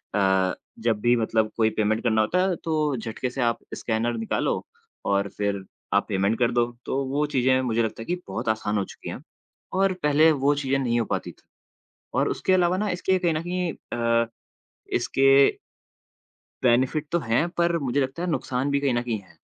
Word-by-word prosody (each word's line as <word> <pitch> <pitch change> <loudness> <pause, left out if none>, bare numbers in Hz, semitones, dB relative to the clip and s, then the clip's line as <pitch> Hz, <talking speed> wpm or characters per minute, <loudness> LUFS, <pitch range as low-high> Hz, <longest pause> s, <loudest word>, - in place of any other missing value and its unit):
अ, 95 -2 +3 0.3
जब 115 -2 +1
भी 120 +1 +4
मतलब 110 -1 +1
कोई 110 -1 +4
पेमेंट 110 0 0
करना 110 -3 +3
होता 175 +12 +1
है 180 - 0
तो 155 -3 0
झटके 115 +3 -4
से 130 +2 -4
आप 120 -1 +1 0.2
स्कैनर 115 +1 -1
निकालो 115 0 -1 0.4
और 100 0 +1
फिर 100 -1 -1 0.3
आप - - +3
पेमेंट 100 +3 +1
कर 120 -1 +3
दो, 120 0 +1
तो 135 +1 -1
वो 140 +3 0
चीज़ें 130 -2 +2
मुझे 115 -2 +1
लगता 110 0 -3
है - - -6
कि 175 - -1
बहुत - - -3
आसान 110 -1 0
हो 100 - +1
चुकी - - -9
हैं - - -6 0.6
और 195 -1 +3
पहले 150 +2 +5
वो 140 0 +2
चीज़ें 135 -1 0
नहीं 120 -3 +1
हो 115 - 0
पाती - - -3
थी। - - -26 0.7
और - - +2
उसके 190 - 0
अलावा 185 +3 +2
इसके 185 +1 +1
कहीं 175 -3 +1
न 155 - -1
कहीं 180 -1 -2 0.2
अ, 115 0 +2 0.7
इसके 135 0 +2 1.3
बेनेफिट 130 +5 +2
तो 170 - +3
हैं 120 +6 +1
पर 170 0 +3
मुझे 140 -2 0
लगता 135 +5 -2
है 180 - -1
नुकसान 130 -3 -1
भी 140 0 +1
कहीं 140 -3 +1
न 120 - +1
कहीं 115 -3 -2
हैं। 95 - -22
125 Hz, 195 wpm, -25 LUFS, 110-150 Hz, 1.3 s, पहले